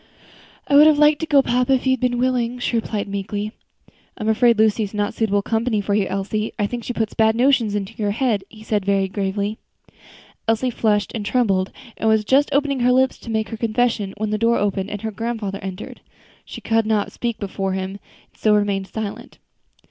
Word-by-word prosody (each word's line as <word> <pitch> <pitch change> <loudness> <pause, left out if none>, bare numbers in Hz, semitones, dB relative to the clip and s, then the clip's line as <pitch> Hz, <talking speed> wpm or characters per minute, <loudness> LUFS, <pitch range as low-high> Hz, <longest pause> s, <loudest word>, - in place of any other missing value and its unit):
"I - - -1
would 300 +2 +9
have 310 -2 +5
liked 300 0 +5
to 320 - -3
go, 280 -3 +5
papa, 250 +2 +2
if 260 - 0
you 260 - +3
had 260 - -1
been 245 0 0
willing," 250 -1 0
she 245 0 -2
replied 220 -3 -2
meekly. 205 +1 -4 0.7
"I 215 - -5
am 215 - 0
afraid 230 +1 +4
Lucy 220 0 +3
is 210 0 -4
not 205 0 0
a - - -8
suitable 205 -3 0
companion 225 -1 0
for 200 - -1
you, 200 -2 +1
Elsie. 200 +3 -2
I 205 - +1
think 235 +3 -4
she - - -4
puts 225 -3 -2
bad 220 0 +3
notions 240 -4 +2
into 195 -2 -3
your 210 -2 -1
head," 220 -2 0
he 215 -1 -14
said 210 -2 -1
very 195 0 +1
gravely. 200 +2 -2 0.9
Elsie 225 +3 +1
flushed 210 -3 0
and 220 - -3
trembled, 200 -5 +1 0.3
and 220 - +1
was 220 -1 +2
just 275 +5 +3
opening 280 -1 +1
her 250 +1 +3
lips 260 +1 +2
to - - -10
make 220 -1 -1
her 225 - -5
confession, 225 -3 0
when 215 0 -2
the 215 - -1
door 230 +1 +3
opened 200 -1 -1
and 205 0 -6
her 220 - -2
grandfather 215 -2 -4
entered. 190 -1 -7 0.4
She - - -9
could 225 -1 +1
not 215 -2 0
speak 235 -2 -3
before 195 -1 -3
him, 190 0 -3
and 200 - -9 0.4
so 215 -1 +3
remained 200 -2 0
silent. 210 +2 -6
220 Hz, 215 wpm, -21 LUFS, 205-240 Hz, 0.9 s, would